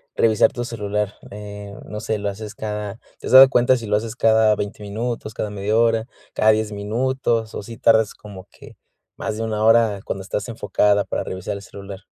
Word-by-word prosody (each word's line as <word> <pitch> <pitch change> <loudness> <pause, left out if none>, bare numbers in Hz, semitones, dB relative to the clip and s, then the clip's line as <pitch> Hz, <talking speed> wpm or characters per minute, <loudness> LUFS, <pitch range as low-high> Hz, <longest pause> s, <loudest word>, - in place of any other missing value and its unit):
revisar 110 -2 +4
tu 120 -3 -4
celular? 105 -3 -3 0.2
Eh, 105 0 -8
no 105 - -6
sé, 110 0 -2
lo 100 0 -2
haces 105 +1 -8
cada 105 0 -5 0.2
¿Te - - -7
has - - -2
dado 130 0 +10
cuenta 130 0 +3
si 115 -2 -7
lo 105 - +2
haces 110 +2 -2
cada 110 -2 +4
20 105 +1 -5
minutos, 110 +1 -4
cada 105 - -3
media 105 +2 -1
hora, 115 -1 +2 0.3
cada 110 - +4
10 110 0 0
minutos, 115 +2 -1
o - - -5
sí 115 +3 -9
tardas 110 -3 +3
como 100 -3 -12
que - - -15 0.4
más 105 - -4
de 115 - -3
1 110 -1 -2
hora 110 -3 +4
cuando 95 - -4
estás 100 +4 -4
enfocada, 105 -2 +1
para - - -3
revisar 95 +2 -5
el 100 - -7
celular? 100 -1 -10
105 Hz, 205 wpm, -21 LUFS, 105-115 Hz, 0.4 s, dado